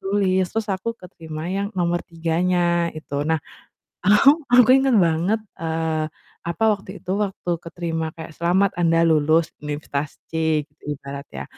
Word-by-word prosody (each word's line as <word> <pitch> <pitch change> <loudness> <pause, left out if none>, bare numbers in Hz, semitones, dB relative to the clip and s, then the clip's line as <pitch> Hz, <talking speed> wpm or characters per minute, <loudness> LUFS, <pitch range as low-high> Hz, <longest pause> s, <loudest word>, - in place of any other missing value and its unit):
tulis, 195 -1 +1
terus 225 -1 -2
aku 190 +4 -3
keterima 160 -4 -8
yang 200 0 -1
nomor 175 0 +1
3-nya 170 +1 +1
itu. 155 -2 -8
Nah 160 - +2 0.7
ahu 210 +7 +6 0.2
aku 245 -1 +7
inget 270 -2 +3
banget, 170 +7 +1 0.2
eee, 160 -1 -1 0.4
apa, 170 - -2
waktu 195 -2 -9
itu, 180 - -4
waktu 190 -2 -5
keterima 165 -1 -3
kayak, 160 0 -8
"Selamat 180 +4 +2
anda 165 -1 +3
lulus 160 0 +3
Universitas 145 -1 -4
C," 160 -2 +1 0.2
ibaratnya, 140 -1 -6
170 Hz, 135 wpm, -22 LUFS, 160-190 Hz, 0.7 s, aku